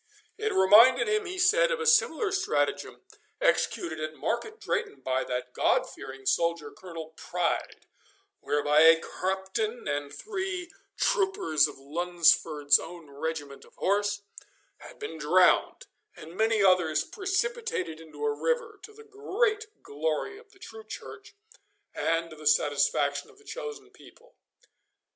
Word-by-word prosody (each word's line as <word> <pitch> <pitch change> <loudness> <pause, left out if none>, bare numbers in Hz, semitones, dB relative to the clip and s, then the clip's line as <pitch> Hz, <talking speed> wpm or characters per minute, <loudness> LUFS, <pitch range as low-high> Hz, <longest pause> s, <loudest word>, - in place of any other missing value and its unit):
It 435 0 -2
reminded 230 +6 +6
him, 425 -2 0
he 365 +1 -6
said, 440 +8 +4
of - - -1
a 455 - -3
similar 450 -4 +3
stratagem 380 -1 -1 0.4
executed 170 - 0
at 155 0 -5
Market 440 - -3
Drayton 420 -3 -3
by 130 0 -1
that 125 0 -4
God - - +2
fearing 135 0 -10
soldier 170 -1 0
Colonel 165 -3 -10
Pride, 180 +1 -3 0.5
whereby 145 +1 +1
a 165 +1 +7
captain 190 +7 -3
and 145 0 -2
three 380 -3 -5 0.3
troopers 390 - +2
of - - -11
Lunsford's 155 -1 +2
own 170 -5 -10
regiment 145 -1 -5
of - - -20
horse 205 +1 0 0.6
had - - -13
been 160 - -7
drowned, 180 +5 +3 0.3
and 165 +3 -12
many 220 0 +2
others 180 -5 +3
precipitated 445 - -3
into 165 - -7
a 440 - +1
river, 480 -2 -2
to 435 - -12
the 445 +1 -14
great 430 +1 -1 0.2
glory 160 - -3
of 445 -2 -20
the - - -22
true 220 -12 -11
Church 215 - -10 0.6
and 165 0 -1
to - - -10
the 155 -1 -5
satisfaction 145 -1 +1
of - - -20
the 425 - -21
chosen 435 -3 -8
people. - - -19
205 Hz, 140 wpm, -28 LUFS, -, 0.6 s, a